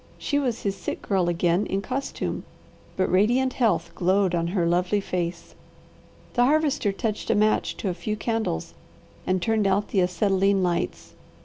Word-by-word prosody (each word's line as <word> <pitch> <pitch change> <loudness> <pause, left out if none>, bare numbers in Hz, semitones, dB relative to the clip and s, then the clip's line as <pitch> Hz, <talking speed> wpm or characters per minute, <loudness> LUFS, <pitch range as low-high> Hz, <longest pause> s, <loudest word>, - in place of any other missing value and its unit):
She 285 - 0
was 250 -5 -2
his 200 -1 -1
sick - - -5
girl 185 -4 +1
again 175 +3 +1
in 195 - -1
costume, 265 +4 -3 0.5
but 190 - +1
radiant 245 +8 +3
health 170 -9 +1
glowed 185 +1 +2
on 170 -1 0
her 175 -1 0
lovely 180 +4 +2
face. 175 -3 -4 0.8
The 245 -1 +4
Harvester 290 -6 +2
touched 215 +2 -3
a - - +3
match 215 +1 +1
to - - -3
a - - -1
few 180 +5 -3
candles 220 - -2 0.5
and 185 0 +2
turned 220 -1 +2
out 195 +2 +1
the 195 - +2
acetylene 195 +2 +2
lights. 170 - -2
195 Hz, 165 wpm, -25 LUFS, 175-220 Hz, 0.8 s, The